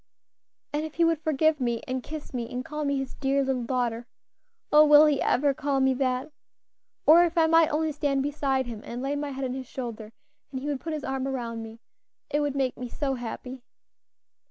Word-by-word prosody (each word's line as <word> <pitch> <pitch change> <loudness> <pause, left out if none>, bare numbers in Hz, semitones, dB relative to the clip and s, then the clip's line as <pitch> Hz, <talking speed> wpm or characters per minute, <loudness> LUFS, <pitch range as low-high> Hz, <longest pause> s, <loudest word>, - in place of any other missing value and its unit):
And 295 +1 0
if 315 -1 -7
he 335 - +3
would 330 -2 +1
forgive 315 0 +2
me, 235 -3 -1
and 255 0 -2
kiss 305 +2 -8
me, 235 -2 -4
and 250 +1 -4
call 300 0 -4
me 280 0 +1
his 270 -1 -4
dear 275 0 0
little 260 -3 -1
daughter. 240 -1 -1 0.6
Oh! 300 +1 +8
will 300 0 +8
he 295 -3 +2
ever 280 +2 +2
call 280 -1 -1
me 265 0 +3
that? 255 +1 -1 0.7
Or 330 +3 +8
if 340 0 -1
I, 325 - +5
might 330 0 +5
only 310 +1 0
stand 280 -2 0
beside 275 -2 0
him 230 -3 -7
and 245 +2 -6
lay 280 +1 -1
my 290 0 -3
head 270 -1 -4
on 250 - -3
his 260 -1 -6
shoulder, 230 -5 -6 0.4
and 260 - -4
he 265 - -7
would 290 -3 -2
put 325 - -4
his 305 -2 -4
arm 265 0 -2
around 235 -4 -4
me, 225 +1 -10 0.5
it 295 - +2
would 290 -2 -1
make 265 -2 0
me 250 -1 -5
so 275 +2 -2
happy." 250 +1 -6
270 Hz, 215 wpm, -27 LUFS, 250-295 Hz, 0.7 s, Oh